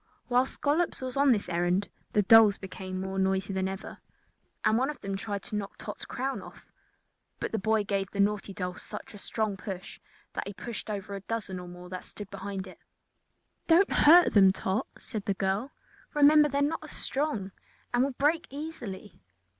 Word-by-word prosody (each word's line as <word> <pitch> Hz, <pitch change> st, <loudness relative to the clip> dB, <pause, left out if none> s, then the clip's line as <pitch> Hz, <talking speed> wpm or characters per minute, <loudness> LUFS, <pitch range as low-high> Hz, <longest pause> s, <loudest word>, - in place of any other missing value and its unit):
While 250 Hz, +1 st, +4 dB
Scollops 305 Hz, +6 st, 0 dB
was 255 Hz, -1 st, -3 dB
on 280 Hz, 0 st, +5 dB
this 210 Hz, -4 st, +1 dB
errand 175 Hz, +3 st, +1 dB, 0.3 s
the 210 Hz, -, +4 dB
dolls 215 Hz, 0 st, +7 dB
became 185 Hz, -1 st, -6 dB
more 190 Hz, 0 st, -3 dB
noisy 190 Hz, 0 st, +1 dB
than 190 Hz, 0 st, 0 dB
ever, 190 Hz, 0 st, -6 dB, 0.7 s
and 215 Hz, -, +4 dB
one 260 Hz, +4 st, +2 dB
of 300 Hz, -, -5 dB
them 195 Hz, -1 st, -3 dB
tried 200 Hz, 0 st, -4 dB
to 215 Hz, -, -6 dB
knock 200 Hz, -1 st, -4 dB
Tot's -, -, -7 dB
crown 270 Hz, +1 st, -3 dB
off. -, -, -13 dB, 0.7 s
But -, -, -3 dB
the 220 Hz, -, -1 dB
boy 220 Hz, +1 st, +2 dB
gave 195 Hz, -1 st, -1 dB
the 200 Hz, -, -7 dB
naughty 205 Hz, 0 st, +1 dB
doll 180 Hz, -2 st, -3 dB
such -, -, -9 dB
a 205 Hz, -, -10 dB
strong 215 Hz, -1 st, -2 dB
push 185 Hz, -1 st, -7 dB, 0.3 s
that -, -, -3 dB
he 200 Hz, -, -5 dB
pushed 230 Hz, 0 st, -6 dB
over 200 Hz, -1 st, -4 dB
a 200 Hz, -, -4 dB
dozen 205 Hz, -3 st, -4 dB
or 180 Hz, -, -8 dB
more 180 Hz, 0 st, -10 dB
that 185 Hz, 0 st, -6 dB
stood 205 Hz, -1 st, -10 dB
behind 195 Hz, -1 st, -5 dB
it. 185 Hz, -, -13 dB, 0.9 s
"Don't 345 Hz, +4 st, +5 dB
hurt 345 Hz, +4 st, +7 dB
them, 195 Hz, -2 st, +7 dB
Tot," 190 Hz, +1 st, -1 dB
said 215 Hz, -5 st, -5 dB
the 200 Hz, -, 0 dB
girl; 195 Hz, +7 st, 0 dB, 0.5 s
"remember 295 Hz, +1 st, +7 dB
they 280 Hz, -, -1 dB
are -, -, +2 dB
not 310 Hz, +1 st, -2 dB
strong 265 Hz, -12 st, -2 dB, 0.4 s
and 245 Hz, +1 st, +4 dB
will 275 Hz, -, +1 dB
break 300 Hz, +6 st, +1 dB
easily." 240 Hz, -, -7 dB
205 Hz, 190 wpm, -29 LUFS, 190-260 Hz, 0.9 s, dolls